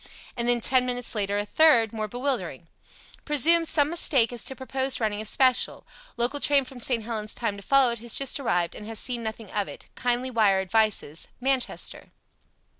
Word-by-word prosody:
And 235 Hz, 0 st, -2 dB
then 240 Hz, -1 st, +3 dB
ten 255 Hz, +2 st, +4 dB
minutes 245 Hz, -1 st, -2 dB
later 205 Hz, -2 st, -1 dB
a 205 Hz, -, -2 dB
third, 235 Hz, -4 st, +4 dB
more 215 Hz, -1 st, -3 dB
bewildering 230 Hz, -, -4 dB, 0.6 s
"Presume 325 Hz, +3 st, +4 dB
some 300 Hz, -2 st, +2 dB
mistake 265 Hz, -8 st, +2 dB
as 240 Hz, -, -3 dB
to 265 Hz, -, -3 dB
proposed 265 Hz, 0 st, -2 dB
running 215 Hz, -2 st, -2 dB
of 215 Hz, -, -6 dB
special. 255 Hz, +2 st, +2 dB, 0.3 s
Local 245 Hz, +5 st, 0 dB
train 280 Hz, -1 st, +2 dB
from 255 Hz, -1 st, -11 dB
St. 235 Hz, -2 st, 0 dB
Helens 215 Hz, -1 st, -3 dB
timed 205 Hz, -4 st, -3 dB
to -, -, -11 dB
follow 270 Hz, +1 st, +4 dB
it 235 Hz, -, -5 dB
has 235 Hz, 0 st, -3 dB
just 275 Hz, +1 st, 0 dB
arrived 175 Hz, -10 st, -1 dB
and 210 Hz, -, -10 dB
has 225 Hz, -1 st, -4 dB
seen 245 Hz, +1 st, 0 dB
nothing 220 Hz, -2 st, -7 dB
of 205 Hz, -2 st, -1 dB
it. -, -, -11 dB
Kindly 245 Hz, +1 st, -2 dB
wire 210 Hz, -5 st, +2 dB
advices. 190 Hz, -5 st, 0 dB
Manchester." 265 Hz, 0 st, -2 dB
240 Hz, 190 wpm, -25 LUFS, 215-265 Hz, 0.6 s, ten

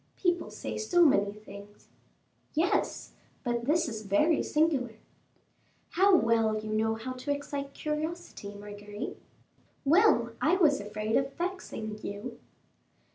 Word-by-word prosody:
"People 355 Hz, -2 st, 0 dB
say -, -, -5 dB
so 355 Hz, -6 st, +4 dB
many 200 Hz, -8 st, +4 dB
things." 205 Hz, -1 st, -13 dB, 0.7 s
"Yes, 335 Hz, +5 st, 0 dB, 0.3 s
but 240 Hz, -2 st, -1 dB
this 320 Hz, +4 st, +2 dB
is 220 Hz, -4 st, -5 dB
very 215 Hz, -, +3 dB
singular." 290 Hz, -7 st, +1 dB, 1.0 s
"How 385 Hz, +2 st, +5 dB
well 225 Hz, -6 st, +3 dB
you 215 Hz, 0 st, -4 dB
know 220 Hz, +1 st, +1 dB
how 255 Hz, +3 st, -5 dB
to 255 Hz, +3 st, -8 dB
excite 285 Hz, -1 st, -4 dB
curiosity, 305 Hz, -8 st, -4 dB
Marguerite." 205 Hz, +2 st, -7 dB, 0.6 s
"Well, 300 Hz, -, +5 dB
I 325 Hz, +4 st, +4 dB
was 310 Hz, -, +4 dB
afraid 215 Hz, +2 st, -2 dB
of 270 Hz, 0 st, -1 dB
vexing 340 Hz, -, -4 dB
you." 220 Hz, +4 st, -6 dB
250 Hz, 125 wpm, -29 LUFS, 215-320 Hz, 1.0 s, How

